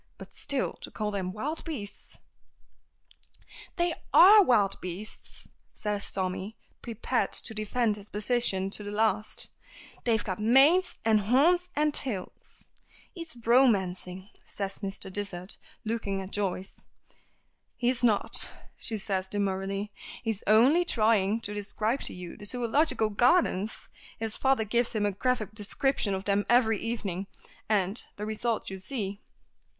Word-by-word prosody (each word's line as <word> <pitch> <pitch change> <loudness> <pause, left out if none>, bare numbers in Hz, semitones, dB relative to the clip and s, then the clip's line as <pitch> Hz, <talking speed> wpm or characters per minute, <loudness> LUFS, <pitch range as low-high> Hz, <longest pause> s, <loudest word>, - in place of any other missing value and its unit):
But - - -12
still, 280 -3 -2
to - - -8
call 210 -1 -4
them 190 -3 -3
wild 285 - -5
beasts 225 -11 -8 0.8
" - - -19
"They 345 -1 +1 0.2
are 415 +4 +8
wild 215 - +2
beasts," 185 +4 -7 0.3
says 210 -1 -3
Tommy, 190 +3 -4 0.2
prepared 235 +2 -2
to 225 - +8
defend 215 0 -1
his 205 0 -11
position 210 -3 0
to 210 - -6
the 205 - -6
last. 215 0 -1 0.5
"They've 225 -3 +1
got 185 -1 -4
manes, 275 +12 +4
and 220 -1 +4
horns, 320 - +2
and 300 0 +1
tails!" 210 -12 -5 0.5
"He's 335 - -8
romancing," 190 -6 +1
says 195 -1 -5
Mr. 195 -1 -6
Dysart 195 -2 -4 0.3
looking 215 -3 -2
at 190 0 -8
Joyce. 195 -2 -4 1.0
"He's 245 0 0
not," 225 -4 +7 0.3
says 220 -4 0
she 190 -2 -2
demurely. 195 0 -3 0.3
"He 225 - 0
is 215 - -7
only 255 +11 +5
trying 220 - +1
to 205 - +5
describe 215 +4 -2
to - - +1
you 180 -1 -9
the 205 - -10
Zoological 245 0 0
Gardens. 225 - +1 0.3
His 220 -1 -3
father 265 -4 +1
gives 235 +3 0
him 210 -2 0
a 205 - +1
graphic 215 0 -2
description 215 0 -1
of 190 0 -6
them 205 0 +1
every 225 -3 +3
evening, 200 -5 -4 0.4
and 200 0 0
the 210 - -6
result 220 0 -3
you 190 - -6
see." 200 -1 -5
215 Hz, 140 wpm, -28 LUFS, 195-245 Hz, 1.0 s, are